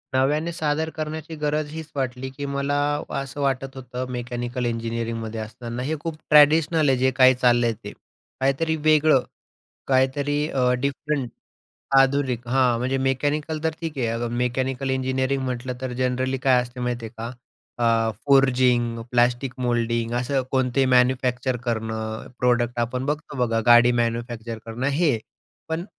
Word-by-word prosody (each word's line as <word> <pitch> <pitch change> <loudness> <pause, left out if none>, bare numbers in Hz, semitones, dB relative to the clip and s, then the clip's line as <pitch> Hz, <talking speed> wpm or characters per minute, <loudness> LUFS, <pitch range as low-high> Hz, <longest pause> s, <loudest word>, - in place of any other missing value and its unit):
नव्याने 150 +5 +1
सादर 160 -1 -1
करण्याची 155 +1 -5
गरज 150 0 -1
हीच 160 -1 -7
वाटली, 130 -1 -3
की 140 +2 -6
मला 140 0 -1 0.5
असं 135 +1 -6
वाटत 135 -1 -1
होतं 125 -1 -5
मेकॅनिकल 120 0 -3
इंजिनिअरिंगमध्ये 115 -1 -3
असताना, 120 +2 -6
हे 155 +4 -1
खूप 160 -1 -5
ट्रॅडिशनल 150 0 +5
आहे 130 - +3
जे 130 +1 +2
काही 130 -1 +6
चाललंय 120 -2 +3
ते. 105 - -6 0.5
काहीतरी 135 +5 +1
वेगळं, 155 -3 +4 0.7
काहीतरी 140 +3 +1
अ, 125 -3 +1
डिफरंट, 140 -1 -2 0.7
आधुनिक 135 -3 +2
हां 125 -2 +3
म्हणजे 130 +2 -1
मेकॅनिकल 145 +4 -1
तर 160 - +3
ठीक 160 -4 -5
आहे, 120 - +1
अ, 115 +1 -2
मेकॅनिकल 130 +2 -1
इंजिनिअरिंग 130 +1 0
म्हटलं 125 0 -3
तर 130 -1 -4
जनरली 130 +1 -1
काय 130 -2 +4
असते 125 +1 -9
माहिती 120 -1 -2
आहे 110 - -11
का? 115 +1 -4 0.5
अ, 115 -1 +2 0.2
फोरजिंग, 125 -4 +3
प्लास्टिक 120 +1 +2
मोल्डिंग, 115 -1 0
असं 130 +2 0
कोणते 130 0 +2
मॅन्युफॅक्चर 125 0 +2
करणं, 110 -1 -3
प्रॉडक्ट 120 -1 +1
आपण 125 +2 -2
बघतो 150 -1 -3
बघा 115 -1 0
गाडी 120 +1 +7
मॅन्युफॅक्चर 115 -1 -4
करणं, 120 +4 -3
हे. 140 -4 +2 0.5
पण 160 +2 -2
130 Hz, 145 wpm, -23 LUFS, 120-140 Hz, 0.7 s, गाडी